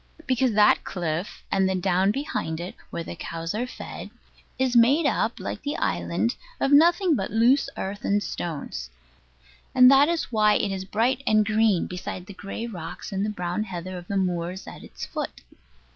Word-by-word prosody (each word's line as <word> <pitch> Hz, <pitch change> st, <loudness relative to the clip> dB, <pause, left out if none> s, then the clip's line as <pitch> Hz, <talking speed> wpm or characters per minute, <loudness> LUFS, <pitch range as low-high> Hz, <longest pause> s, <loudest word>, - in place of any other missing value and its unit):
Because 255 Hz, -2 st, +1 dB
that 210 Hz, 0 st, +5 dB
cliff, 175 Hz, +1 st, -4 dB
and 190 Hz, -1 st, +2 dB
the 190 Hz, -, 0 dB
down 185 Hz, +1 st, +2 dB
behind 205 Hz, -, -2 dB
it, 175 Hz, +2 st, -5 dB, 0.2 s
where 170 Hz, -, -4 dB
the 175 Hz, -, -7 dB
cows 165 Hz, +1 st, -5 dB
are 240 Hz, +4 st, -2 dB
fed, -, -, -8 dB, 0.5 s
is 260 Hz, -1 st, +1 dB
made 265 Hz, +7 st, +5 dB
up, -, -, 0 dB
like -, -, -5 dB
the 290 Hz, -, -3 dB
island, -, -, 0 dB, 0.2 s
of 275 Hz, -, +1 dB
nothing 340 Hz, +3 st, +5 dB
but 195 Hz, -6 st, -2 dB
loose 235 Hz, +6 st, +3 dB
earth 200 Hz, +2 st, -4 dB
and 205 Hz, +1 st, +1 dB
stones; 145 Hz, -, -5 dB, 0.9 s
and 255 Hz, 0 st, +8 dB
that 275 Hz, +3 st, +6 dB
is 340 Hz, -6 st, -1 dB
why 215 Hz, -2 st, +4 dB
it 205 Hz, -, 0 dB
is 190 Hz, -1 st, -4 dB
bright 240 Hz, +7 st, +1 dB
and 215 Hz, -1 st, +4 dB
green 215 Hz, -3 st, +2 dB
beside 180 Hz, 0 st, -6 dB
the 200 Hz, -, -10 dB
gray 200 Hz, +4 st, -6 dB
rocks 175 Hz, -8 st, -7 dB
and 205 Hz, +2 st, -2 dB
brown 180 Hz, +4 st, -2 dB
heather 185 Hz, -1 st, -6 dB
of 175 Hz, -1 st, -8 dB
the 200 Hz, -, -1 dB
moors 180 Hz, 0 st, -2 dB
at -, -, -10 dB
its -, -, -8 dB
foot. -, -, -5 dB
205 Hz, 180 wpm, -25 LUFS, 180-245 Hz, 0.9 s, and